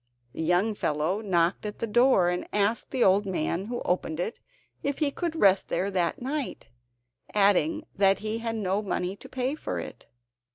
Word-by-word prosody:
The - - -5
young 180 +7 +2
fellow 160 +2 -1
knocked 175 -4 +1
at 210 -1 -5
the - - -2
door 240 -4 +4
and 180 0 -2
asked 210 +2 0
the 260 -3 +1
old 195 +2 +4
man 180 0 -1
who 240 +2 -4
opened 175 -3 -1
it 200 +6 -3 0.4
if 280 -1 -2
he 295 -3 +1
could 335 +2 -3
rest 195 -10 +4
there 195 +2 -1
that 180 -3 0
night, 275 - -4 0.7
adding 210 - +3
that 195 0 +4
he 215 +2 -3
had 230 0 -3
no 200 -1 0
money 190 -2 -2
to - - -13
pay 260 +1 -1
for 310 - -4
it. - - -8
205 Hz, 180 wpm, -27 LUFS, 185-240 Hz, 0.7 s, door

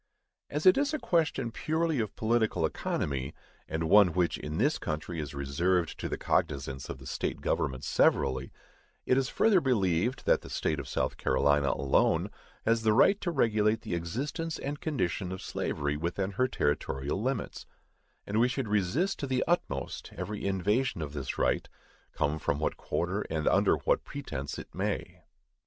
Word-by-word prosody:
As 150 +2 -3
it 185 +8 +7
is 290 +2 +1
a - - 0
question 155 - 0
purely 160 +2 0
of 110 -3 -2
political 110 -6 +1
economy, 70 -2 -2 0.3
and 80 0 -2
one 100 -1 +6
which 90 -1 +1
in 75 +1 -4
this 145 - +2
country 80 +2 -4
is 75 -2 -5
reserved 85 +6 0
to - - -3
the - - -2
cognizance 70 -2 -1
of - - -5
the 65 - -13
state - - -3
governments 65 -1 -1
severally, 65 +1 +2 0.5
it 130 - +3
is 135 0 +1
further 210 -5 +4
believed, 110 - +1
that - - +4
the - - -11
State 75 -2 -1
of 70 - -6
South - - -1
Carolina 70 +2 +2
alone 70 0 +2 0.3
has 115 0 +3
the 110 -1 +3
right 195 - +5
to 175 - -1
regulate 110 -7 +2
the 110 -5 -5
existence 140 - -3
and 145 +1 -5
condition 95 - -1
of 95 - -5
slavery 70 -4 -2
within 90 +5 -2
her 125 +6 +1
territorial 75 - -1
limits; 130 -1 -3 0.6
and 105 +2 0
we 120 - +5
should 125 -1 -2
resist 105 - +1
to 140 - -3
the 130 -1 +1
utmost 70 - -2
every 100 +3 -3
invasion 100 +1 0
of 75 -1 -6
this 70 -3 -4
right, - - +1 0.4
come 75 +2 -1
from 70 - 0
what 75 - -1
quarter 95 +5 -2
and 80 -1 -1
under - - +4
whatever - - +1
pretence 70 - -5
it - - -9
may. - - -3
95 Hz, 170 wpm, -30 LUFS, -, 0.6 s, it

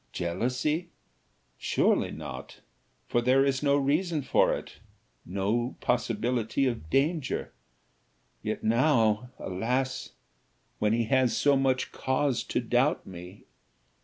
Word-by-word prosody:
Jealousy? 125 - -1 0.7
surely - - +2
not; - - -8 0.5
for 120 - +1
there 130 +3 +4
is 135 -1 0
no 140 -1 +3
reason 150 +3 +1
for - - +3
it - - -5 0.5
no 105 +7 -1
possibility 120 +1 0
of 115 -11 -2
danger. 145 - 0 0.9
Yet - - -3
now, 115 -2 +3
alas! 125 +8 -2 0.7
when 105 0 +2
he 115 0 +2
has 130 +1 +2
so 145 -1 +4
much 135 -1 +1
cause 130 -1 0
to - - -1
doubt 125 +5 +1
me! 90 +1 -10
125 Hz, 110 wpm, -28 LUFS, 115-135 Hz, 0.9 s, there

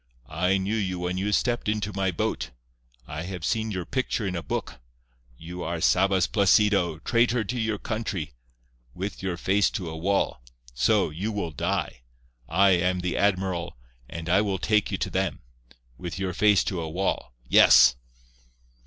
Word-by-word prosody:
I 90 +7 +1
knew 95 +3 -2
you 95 -4 -2
when 90 +1 -2
you 100 +2 -1
stepped 120 0 0
into 105 -1 -2
my 95 0 0
boat. 70 -6 -2 0.6
I 75 +4 -6
have 90 -2 -5
seen 110 -1 0
your 90 -4 -4
picture 130 -2 -2
in 95 -2 -2
a 85 - -2
book. - - -4 0.6
You 90 +4 -8
are 85 0 -3
Sabas 95 +2 +3
Placido, 100 -4 +3
traitor 115 +5 +1
to 120 +4 -4
your 110 -2 -1
country. 100 - -4 0.6
With 95 +2 -5
your 95 -2 -3
face 100 +4 +2
to 85 -5 -5
a - - -6
wall. 95 -4 0 0.3
So, 80 - +2
you 95 +8 -3
will 100 -6 -3
die. 70 -4 -2 0.5
I 95 +4 +4
am 90 0 +1
the 90 0 -2
admiral, 95 -6 0 0.3
and 80 +1 -7
I 90 +4 +4
will 100 -2 -1
take 105 +4 +1
you 95 - -2
to 95 0 -3
them. 95 -3 -2 0.6
With 90 0 -6
your 95 -1 -2
face 105 0 +4
to 90 -4 -3
a 80 - -4
wall. 85 -7 -2
Yes." 60 - +7
95 Hz, 170 wpm, -26 LUFS, 85-105 Hz, 0.6 s, Yes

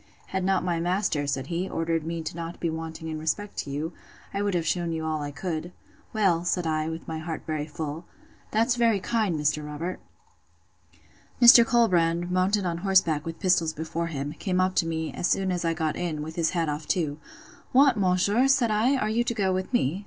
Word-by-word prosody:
Had 190 -1 -2
not 190 0 +1
my 175 -2 0
master, 175 -4 0
said 135 -2 -1
he, 175 +5 -3
ordered 165 -1 -1
me 165 -1 -3
not 170 0 -6
to - - -22
be 170 - -1
wanting 160 0 -6
in 155 -1 -4
respect 160 +7 -2
to - - -3
you, 150 +4 -3 0.4
I 200 - -1
would 205 -2 0
have 170 -2 0
shewn 170 -1 0
you 160 -1 -3
all 155 -1 -1
I 145 - -3
could. 165 +3 -4 0.4
Well, 190 -6 +2
said 180 0 0
I, 155 0 0
with 160 0 -7
my 160 -1 -4
heart 160 0 -5 0.3
full, 155 +2 -5 0.4
that's 230 +3 +2
very 230 -4 +3
kind, 215 -3 0
Mr. 150 +1 0
Robert. 150 +5 -5 1.4
Mr. 240 -1 +10
Colbrand, 175 -7 +2
mounted 185 +2 +2
on 170 -1 -2
horseback, 170 -5 +2
with 165 0 -6
pistols 170 -4 +2
before 160 +2 -3
him, 145 -2 -4
came 185 +2 -2
up 185 0 +2
to 165 - +3
me, 160 -1 -3
as 175 - -1
soon 190 0 +1
as 175 -1 -2
I 165 0 0
got 160 -2 -1
in, 160 -4 -3
with 160 +1 -7
his 165 -2 +1
hat 165 -1 +1
off 150 0 -4
too. 155 -4 -1 0.5
What, 270 -1 +5
monsieur! 200 +5 +2
said 265 -4 +3
I, 225 +6 +3
are 215 - 0
you 225 +2 +1
to 235 0 -2
go 190 -3 +1
with 185 +4 -3
me? 185 - +1
170 Hz, 210 wpm, -26 LUFS, 160-195 Hz, 1.4 s, Mr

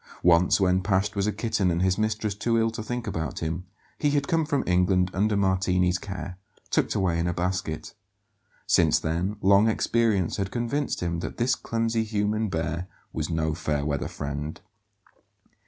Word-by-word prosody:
Once, 90 +2 +5
when 95 -1 +3
Pasht 95 +1 0
was 100 0 0
a - - +2
kitten 105 -3 0
and 85 +1 +1
his 95 -1 +3
mistress 110 0 -1
too 115 +3 0
ill 115 0 +2
to 110 - -5
think 120 +2 -4
about 80 -6 -3
him, 80 +3 -3 0.3
he 150 - +2
had 145 -1 +1
come 165 -2 +1
from 140 -4 +1
England 90 +1 +2
under 105 +2 +1
Martini's 90 -2 +2
care, 95 -2 -7 0.3
tucked - - +1
away 90 -3 +1
in 85 - 0
a 85 - -1
basket. 90 -3 -2 0.7
Since - - +4
then, 85 +6 -1
long 100 +3 +6
experience 110 -5 +1
had 100 -2 -1
convinced 120 +6 -2
him 85 -1 -1
that - - -5
this 125 +1 +2
clumsy 115 -1 -1
human 105 0 -1
bear 85 +1 -2 0.3
was 80 0 -2
no 80 -1 0
fair 75 -3 -1
weather 70 -2 -1
friend. 75 +2 -5
95 Hz, 170 wpm, -26 LUFS, 85-110 Hz, 0.7 s, long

